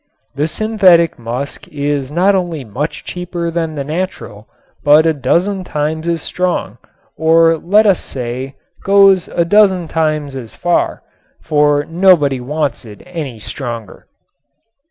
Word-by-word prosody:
The 145 +3 -1
synthetic 185 - +3
musk 120 +5 -6
is 145 -2 -3
not 185 +5 +3
only 175 -6 -2
much 130 +8 -5
cheaper 175 -1 -4
than 165 -2 -2
the 140 - -3
natural, 150 - -5 0.4
but 150 +2 +5
a 160 - +3
dozen 175 +8 0
times 155 0 -3
as 170 -2 -1
strong, 180 -1 -2 0.4
or 165 +1 +4
let 205 +7 +3
us 195 -4 +4
say, 130 +1 -5 0.3
goes 195 -2 +4
a 170 - 0
dozen 190 -2 +3
times 155 -3 -1
as 120 -4 -8
far, 175 0 -1 0.4
for 145 -1 +2
nobody 165 -6 +3
wants 145 +3 -2
it 105 -3 -13
any 160 -9 -6
stronger. 115 -2 -7
160 Hz, 135 wpm, -16 LUFS, 140-180 Hz, 0.4 s, but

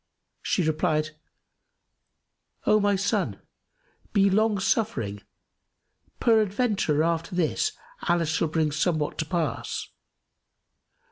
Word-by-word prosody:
She 185 - 0
replied, 155 -1 0 1.5
"O 215 0 +5
my 205 -1 +2
son, 195 +1 -1 0.7
be 200 -2 +4
long 215 +1 +3
suffering: 130 - -1 1.0
peradventure, 210 - +2
after 165 +1 -1
this 180 - +1 0.4
Allah 170 -1 +3
shall 160 +1 0
bring 155 -1 0
somewhat 150 0 0
to 160 - -1
pass. 170 -2 -2
175 Hz, 90 wpm, -26 LUFS, 155-205 Hz, 1.5 s, O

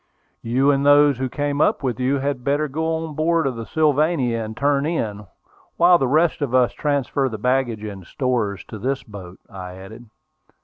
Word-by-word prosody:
"You 130 +5 +2
and 140 0 +1
those 145 -2 +5
who 130 -1 -2
came 145 +1 -2
up - - +2
with 125 -3 -2
you 130 +2 +1
had 135 -2 -3
better 145 +3 0
go 160 +3 -2
on 155 - -8
board 165 +2 +1
of 130 -2 -1
the 115 -1 -7
Sylvania 150 -6 +1
and 110 0 -8
turn 140 +1 +1
in, 105 - -3 0.5
while 175 0 +5
the 135 - +1
rest 155 +4 +2
of 130 -3 -1
us 125 -2 +3
transfer 140 -2 -1
the 110 - -5
baggage 125 -1 0
and 100 -3 -7
stores 115 -7 -2
to 110 - -7
this 130 +4 -2
boat," 95 -4 -11
I 90 -3 -9
added. 110 +5 -12
130 Hz, 190 wpm, -21 LUFS, 115-145 Hz, 0.5 s, those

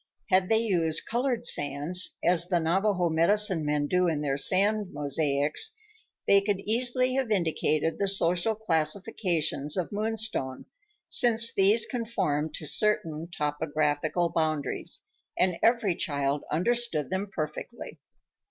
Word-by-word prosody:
Had 185 0 +2
they 220 - +3
used 165 -7 0
colored 240 0 -2
sands, 145 +2 +2
as 175 0 +3
the 180 -2 0
Navajo 180 +2 0
medicine 170 +2 +2
men 150 0 -1
do 180 +4 +1
in 155 -3 -1
their 140 -2 -1
sand 200 +8 +2
mosaics, 145 - 0 0.5
they 200 0 +4
could 200 -1 -2
easily 250 +4 +2
have 265 -3 -1
indicated 160 -4 0
the 200 - 0
social 190 +2 +1
classifications 165 -5 -1
of 180 - -3
Moonstone, 215 - -1 0.4
since 230 -1 +4
these 205 +4 +4
conformed 190 - -3
to 155 - -7
certain 165 0 0
topographical 155 +1 -2
boundaries, 155 -3 -3 0.4
and 180 -2 +1
every 230 -5 +2
child 140 -2 -2
understood 175 - -1
them 190 +2 -3
perfectly. 155 +9 -7
175 Hz, 125 wpm, -27 LUFS, 155-215 Hz, 0.5 s, they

